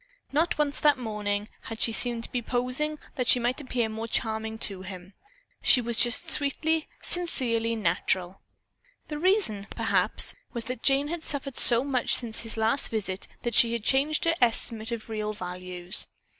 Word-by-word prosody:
Not 315 Hz, +4 st, 0 dB
once 295 Hz, -1 st, +3 dB
that 295 Hz, -2 st, +3 dB
morning 210 Hz, -3 st, -3 dB, 0.2 s
had 225 Hz, 0 st, -7 dB
she 230 Hz, -, +3 dB
seemed 235 Hz, 0 st, 0 dB
to -, -, -8 dB
be 245 Hz, -, -2 dB
posing 255 Hz, +6 st, -1 dB, 0.2 s
that 250 Hz, -2 st, -1 dB
she 250 Hz, -, +6 dB
might 245 Hz, +4 st, -1 dB
appear 250 Hz, -4 st, -2 dB
more 220 Hz, +1 st, -6 dB
charming 220 Hz, -1 st, -2 dB
to 195 Hz, -4 st, -1 dB
him. 185 Hz, 0 st, -10 dB, 0.5 s
She 255 Hz, -, +6 dB
was 235 Hz, -1 st, -3 dB
just 245 Hz, +8 st, +3 dB
sweetly, 315 Hz, +1 st, +1 dB, 0.2 s
sincerely 235 Hz, -10 st, 0 dB
natural. 185 Hz, -1 st, -1 dB, 0.7 s
The 300 Hz, -1 st, -5 dB
reason, 350 Hz, -, +1 dB
perhaps, -, -, +3 dB, 0.2 s
was 235 Hz, -2 st, -3 dB
that 255 Hz, 0 st, -5 dB
Jane 275 Hz, +1 st, +2 dB
had 340 Hz, 0 st, -4 dB
suffered 280 Hz, -3 st, -5 dB
so 235 Hz, +1 st, +7 dB
much 265 Hz, -3 st, 0 dB
since 230 Hz, -2 st, -4 dB
his 225 Hz, -1 st, -7 dB
last 225 Hz, +5 st, +1 dB
visit 195 Hz, -4 st, -4 dB, 0.2 s
that 240 Hz, -1 st, -2 dB
she 235 Hz, +2 st, +5 dB
had 235 Hz, -2 st, -3 dB
changed 285 Hz, +7 st, +2 dB
her 330 Hz, -, +3 dB
estimate 230 Hz, -1 st, 0 dB
of 230 Hz, -2 st, -5 dB
real 215 Hz, -1 st, -4 dB
values. 180 Hz, -1 st, -3 dB
235 Hz, 170 wpm, -26 LUFS, 215-275 Hz, 0.7 s, so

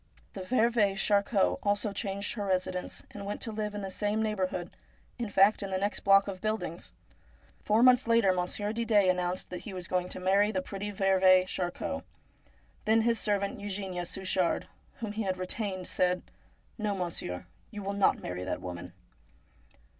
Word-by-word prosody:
The 195 Hz, -, -6 dB
veuve 220 Hz, -1 st, +2 dB
Charcot 200 Hz, 0 st, +2 dB
also 205 Hz, 0 st, 0 dB
changed 200 Hz, -1 st, -2 dB
her 210 Hz, -, -4 dB
residence, 185 Hz, -1 st, -2 dB
and 200 Hz, -, -8 dB
went 205 Hz, +1 st, -4 dB
to 225 Hz, -, -2 dB
live 210 Hz, -1 st, -3 dB
in 205 Hz, -, -4 dB
the 190 Hz, -, -4 dB
same 210 Hz, +2 st, -1 dB
neighbourhood, 185 Hz, -4 st, -2 dB, 0.5 s
in 235 Hz, -3 st, -2 dB
fact 200 Hz, +2 st, +4 dB
in 200 Hz, -, -4 dB
the 190 Hz, -, -1 dB
next 205 Hz, +2 st, -1 dB
block 195 Hz, 0 st, +5 dB
of 190 Hz, -2 st, -5 dB
buildings. 215 Hz, 0 st, -3 dB, 0.7 s
Four 215 Hz, +3 st, +2 dB
months 250 Hz, -1 st, +6 dB
later 230 Hz, -5 st, +4 dB
Monsieur 185 Hz, +4 st, -1 dB
Didet 215 Hz, -5 st, +3 dB
announced 180 Hz, 0 st, -2 dB
that 180 Hz, -, -4 dB
he 210 Hz, -, -8 dB
was 180 Hz, -2 st, -5 dB
going 180 Hz, -1 st, -1 dB
to -, -, -4 dB
marry 195 Hz, +3 st, +3 dB
the 185 Hz, -3 st, -2 dB
pretty 200 Hz, +2 st, -5 dB
veuve 190 Hz, -1 st, +4 dB
Charcot. 185 Hz, +10 st, -3 dB, 0.8 s
Then 220 Hz, +1 st, +4 dB
his 230 Hz, 0 st, +2 dB
servant 200 Hz, -1 st, 0 dB
Eugenia 190 Hz, -3 st, -3 dB
Suchard, 185 Hz, -2 st, 0 dB, 0.4 s
whom 220 Hz, -2 st, -3 dB
he 215 Hz, +2 st, -3 dB
had 190 Hz, -3 st, -1 dB
retained, 185 Hz, 0 st, -2 dB
said: 180 Hz, 0 st, +1 dB, 0.3 s
' -, -, -36 dB
No, 210 Hz, -2 st, 0 dB
monsieur, 165 Hz, -, -4 dB, 0.2 s
you 205 Hz, -, -7 dB
shall 200 Hz, +1 st, -2 dB
not 200 Hz, -1 st, +2 dB
marry 90 Hz, 0 st, -4 dB
that 95 Hz, -, -3 dB
woman.' 90 Hz, -1 st, -7 dB
195 Hz, 175 wpm, -30 LUFS, 185-210 Hz, 0.8 s, months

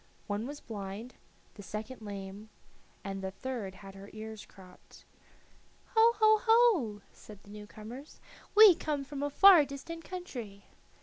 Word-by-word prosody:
One 210 Hz, +3 st, -3 dB
was 290 Hz, +1 st, -7 dB
blind, 210 Hz, +2 st, -7 dB, 0.4 s
the 205 Hz, -, -11 dB
second 215 Hz, +5 st, -7 dB
lame, 200 Hz, 0 st, -8 dB, 0.5 s
and 195 Hz, 0 st, -5 dB
the 190 Hz, -, -3 dB
third 210 Hz, -2 st, -6 dB
had 195 Hz, 0 st, -12 dB
her 195 Hz, +1 st, -12 dB
ears 220 Hz, 0 st, -9 dB
cropped. 185 Hz, -2 st, -17 dB, 0.9 s
"Ho, 455 Hz, +1 st, +6 dB
ho, 435 Hz, -1 st, +5 dB
ho!" 415 Hz, -, +4 dB
said 210 Hz, -, -14 dB
the 205 Hz, -, -15 dB
new 210 Hz, 0 st, -10 dB
comers. 235 Hz, +8 st, -11 dB, 0.4 s
"We 425 Hz, -3 st, +10 dB
come 300 Hz, -3 st, -3 dB
from 280 Hz, 0 st, -7 dB
a 290 Hz, -, -1 dB
far 360 Hz, +1 st, +7 dB
distant 290 Hz, +4 st, -8 dB
country." 245 Hz, -, -8 dB
220 Hz, 145 wpm, -31 LUFS, 205-300 Hz, 0.9 s, We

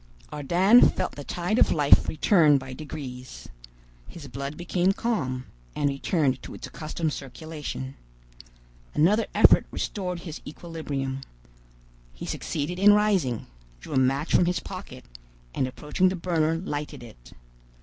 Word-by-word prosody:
Ardan 175 Hz, -, +5 dB
felt -, -, -2 dB
the 145 Hz, -, -8 dB
tide 180 Hz, -, -1 dB
of -, -, +5 dB
life 145 Hz, -2 st, +5 dB
return 155 Hz, -2 st, +4 dB
by 130 Hz, -1 st, -7 dB
degrees. 130 Hz, -4 st, -8 dB, 0.6 s
His 155 Hz, -5 st, -10 dB
blood 140 Hz, +3 st, -6 dB
became 180 Hz, +2 st, +1 dB
calm, 130 Hz, -, -2 dB, 0.3 s
and 145 Hz, -, +1 dB
returned 140 Hz, -1 st, 0 dB
to -, -, -9 dB
its -, -, -8 dB
accustomed 155 Hz, 0 st, -3 dB
circulation. 145 Hz, -1 st, -6 dB, 1.0 s
Another 205 Hz, +9 st, +3 dB
effort -, -, +6 dB
restored 180 Hz, -4 st, -4 dB
his 165 Hz, -3 st, -8 dB
equilibrium. 145 Hz, -5 st, -5 dB, 0.9 s
He -, -, -7 dB
succeeded 165 Hz, +4 st, -3 dB
in 205 Hz, +1 st, +7 dB
rising, 195 Hz, -, +1 dB, 0.3 s
drew -, -, -9 dB
a 135 Hz, -, +3 dB
match 135 Hz, +4 st, +1 dB
from -, -, +5 dB
his 180 Hz, +1 st, 0 dB
pocket, 185 Hz, -10 st, -9 dB, 0.5 s
and 130 Hz, -, 0 dB
approaching 150 Hz, +8 st, 0 dB
the 190 Hz, -, -2 dB
burner 165 Hz, -3 st, 0 dB
lighted 150 Hz, -6 st, -5 dB
it. -, -, -14 dB
155 Hz, 135 wpm, -26 LUFS, 135-180 Hz, 1.0 s, in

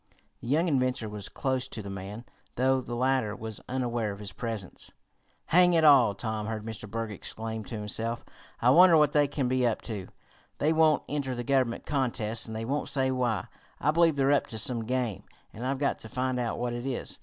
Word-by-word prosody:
The -, -, -9 dB
young 155 Hz, +7 st, +2 dB
inventor 130 Hz, -6 st, 0 dB
was 105 Hz, -1 st, -6 dB
close 130 Hz, -2 st, -1 dB
to 110 Hz, -4 st, -7 dB
the 100 Hz, -, -7 dB
man, 100 Hz, +4 st, -7 dB, 0.3 s
though 130 Hz, +1 st, +2 dB
the 120 Hz, -1 st, -6 dB
latter 130 Hz, -3 st, +1 dB
was 110 Hz, -2 st, -7 dB
unaware 120 Hz, -4 st, -1 dB
of 100 Hz, -, -7 dB
his 100 Hz, -1 st, -7 dB
presence. 110 Hz, -3 st, -6 dB, 0.6 s
"Hang 180 Hz, 0 st, +6 dB
it 165 Hz, -1 st, +3 dB
all!" 130 Hz, -9 st, +6 dB
Tom 110 Hz, +1 st, -3 dB
heard 110 Hz, -1 st, -4 dB
Mr. 110 Hz, -2 st, -7 dB
Berg 115 Hz, 0 st, -3 dB
exclaim 110 Hz, +2 st, -6 dB
to 115 Hz, -, -6 dB
himself. 115 Hz, +3 st, -1 dB, 0.4 s
"I 125 Hz, -, +6 dB
wonder 175 Hz, +2 st, +7 dB
what 150 Hz, -1 st, +4 dB
they 145 Hz, -1 st, +3 dB
can 140 Hz, -2 st, -1 dB
be 130 Hz, 0 st, +1 dB
up 115 Hz, -, 0 dB
to? 105 Hz, -5 st, -5 dB, 0.5 s
They 155 Hz, +2 st, +2 dB
won't 155 Hz, -1 st, +4 dB
enter 140 Hz, -3 st, -2 dB
the 120 Hz, -, -4 dB
Government 130 Hz, -2 st, 0 dB
contests, 115 Hz, -6 st, -1 dB
and 110 Hz, -, -6 dB
they 110 Hz, +1 st, -3 dB
won't 140 Hz, +4 st, -1 dB
say 130 Hz, -1 st, +2 dB
why. 125 Hz, -4 st, 0 dB, 0.3 s
I 150 Hz, -, +2 dB
believe 165 Hz, -1 st, +4 dB
they're 135 Hz, 0 st, +2 dB
up 145 Hz, -, +2 dB
to 110 Hz, -, -5 dB
some 115 Hz, +1 st, +1 dB
game, 125 Hz, -5 st, -2 dB, 0.3 s
and 115 Hz, -, -8 dB
I've 135 Hz, +1 st, -1 dB
got 140 Hz, +1 st, 0 dB
to 110 Hz, -, -10 dB
find 130 Hz, +1 st, -1 dB
out 120 Hz, -2 st, -2 dB
what 120 Hz, 0 st, -2 dB
it 120 Hz, +2 st, -4 dB
is. 130 Hz, -, -4 dB
125 Hz, 210 wpm, -28 LUFS, 110-135 Hz, 0.6 s, wonder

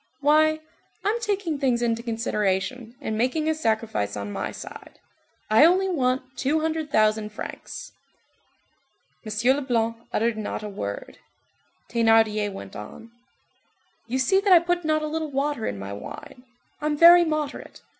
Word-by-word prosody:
Why, 310 Hz, +2 st, +4 dB, 0.5 s
I'm 445 Hz, +3 st, +1 dB
taking 390 Hz, -8 st, -1 dB
things 250 Hz, -4 st, +1 dB
into 230 Hz, -1 st, 0 dB
consideration 225 Hz, +1 st, -2 dB
and 220 Hz, -, -3 dB
making 255 Hz, +8 st, 0 dB
a 315 Hz, -, +3 dB
sacrifice 220 Hz, -, -1 dB
on 100 Hz, 0 st, -5 dB
my -, -, -3 dB
side. -, -, -10 dB, 0.5 s
I 215 Hz, +6 st, +6 dB
only 370 Hz, +4 st, +5 dB
want 255 Hz, -4 st, -1 dB
two 300 Hz, +5 st, 0 dB
hundred 315 Hz, -1 st, -2 dB
thousand 215 Hz, -3 st, +2 dB
francs." 210 Hz, -, -8 dB, 1.3 s
M. 225 Hz, +4 st, +2 dB
Leblanc 230 Hz, -5 st, -1 dB
uttered 230 Hz, 0 st, 0 dB
not 215 Hz, 0 st, -4 dB
a 210 Hz, -, -5 dB
word. 100 Hz, -, -6 dB, 0.7 s
Thénardier 225 Hz, -3 st, +3 dB
went 100 Hz, -, -9 dB
on:— 165 Hz, -, -10 dB, 1.0 s
"You 250 Hz, +3 st, -1 dB
see 265 Hz, +9 st, +3 dB
that 395 Hz, 0 st, +1 dB
I 360 Hz, -, +10 dB
put 350 Hz, +1 st, 0 dB
not 310 Hz, 0 st, +1 dB
a -, -, -1 dB
little 315 Hz, 0 st, -3 dB
water 280 Hz, -3 st, -1 dB
in 100 Hz, -, -3 dB
my 100 Hz, +1 st, -6 dB
wine; 250 Hz, -, -10 dB, 0.4 s
I'm 300 Hz, 0 st, 0 dB
very 345 Hz, +2 st, +9 dB
moderate. 305 Hz, -3 st, -4 dB
255 Hz, 145 wpm, -25 LUFS, 220-310 Hz, 1.3 s, I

